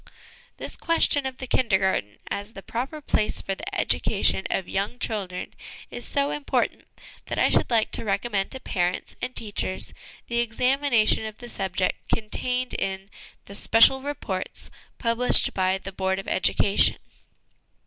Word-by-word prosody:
This - - -4
question 295 -4 +2
of 260 -1 -7
the 260 - -6
Kindergarten, 190 - +1
as 205 +2 -4
the 195 - -10
proper 270 +6 -4
place 215 -6 +1
for 195 - -1
the - - -5
education 190 - +2
of 190 - -1
young 200 +5 -2
children, 195 -7 -3 0.4
is 240 - -6
so 280 0 0
important 295 - -1 0.4
that - - -3
I - - +4
should - - +2
like 230 -3 +2
to - - -1
recommend 200 -1 -1
to 265 - -6
parents 180 -6 -2
and 255 - -4
teachers 205 -3 0 0.3
the 235 0 -1
examination 240 -1 +2
of 215 -1 -9
the 240 - -10
subject 190 -4 -2
contained 250 +3 -1
in 195 +1 -3 0.3
the 200 - -10
Special 230 +5 +5
Reports 260 -10 -5 0.3
published 230 +1 +3
by 185 0 +1
the 195 0 -8
Board 190 0 -1
of 195 - -6
Education. 200 +1 +3
215 Hz, 150 wpm, -25 LUFS, 190-250 Hz, 0.4 s, Special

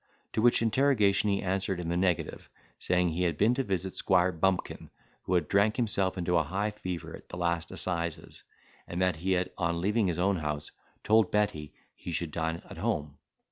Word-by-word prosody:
To 110 - +1
which 120 0 +4
interrogation 110 -4 +3
he 100 -1 0
answered 95 0 -1
in 85 -2 -4
the 85 - 0
negative, 90 -2 -1 0.3
saying, 90 -1 +2
he 85 +2 -2
had 85 -4 +1
been 110 +7 +4
to 135 +2 0
visit 95 -3 -2
Squire 90 -1 +3
Bumpkin, 90 +2 -1 0.4
who 90 - +1
had 85 -4 +1
drank 100 +2 +3
himself 100 -6 0
into 90 0 +1
a 80 - +3
high 100 +7 -2
fever 90 -5 -6
at - - -16
the - - -7
last 85 -1 -1
assizes; 85 -3 -3 0.5
and 85 - -4
that 90 -3 +1
he 95 +4 0
had, 90 0 0
on 85 -1 0
leaving 105 +3 +1
his 85 -3 -1
own 95 +2 +2
house, 75 -2 -3 0.3
told 110 -2 +4
Betty 105 -8 -1 0.2
he - - -8
should 85 -1 -2
dine 80 +1 -2
at - - -10
home. 75 -1 -2
90 Hz, 195 wpm, -29 LUFS, 85-100 Hz, 0.5 s, which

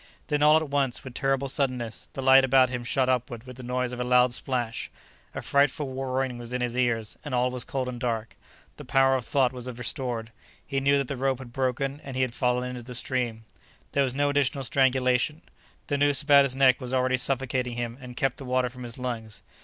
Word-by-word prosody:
Then 150 -1 +1
all 150 +1 +7
at 160 -1 -1
once, 140 -3 0
with 130 - -9
terrible 135 0 0
suddenness, 130 -5 -2
the 135 - -5
light 135 0 +7
about 130 -1 +4
him 120 -1 -3
shot 130 +1 +1
upward 125 -2 -1
with 125 -1 -10
the - - -8
noise 125 0 -2
of 125 - -6
a - - 0
loud 125 0 +4
splash; 120 -2 -2 0.5
a - - -4
frightful 140 -1 +1
roaring 130 -1 -2
was 120 0 -8
in 125 - -1
his 120 -1 -2
ears, 120 -4 0
and 145 -4 -3
all 125 +1 +2
was 125 -1 -2
cold 135 -5 -3
and 125 -1 -5
dark. 115 -2 -3 0.4
The - - -9
power 135 -1 +3
of 125 -3 -2
thought 135 -4 +2
was 125 -1 -7
restored; 120 -1 -3 0.3
he 135 -1 -1
knew 140 +1 +3
that 140 -2 -1
the 140 - -3
rope 135 0 0
had 125 -2 -11
broken 135 +2 -1
and 135 -2 -7
he 130 - +1
had 125 -2 -2
fallen 125 0 0
into 125 -1 -6
the 125 +1 -8
stream. 120 -3 -2 0.5
There 140 - +2
was 130 -1 -2
no 145 +1 +2
additional 140 -1 0
strangulation; 130 +3 +2 0.4
the 145 -1 -1
noose 145 0 +3
about 140 -1 +6
his 130 -1 -1
neck 135 -1 +4
was 125 +1 -2
already 130 0 +2
suffocating 125 -1 0
him 120 +1 -4
and 125 -1 -10
kept 135 -2 0
the - - -9
water 125 0 +1
from 125 +1 -12
his 120 0 -5
lungs. 115 -4 -5
130 Hz, 225 wpm, -26 LUFS, 125-135 Hz, 0.5 s, all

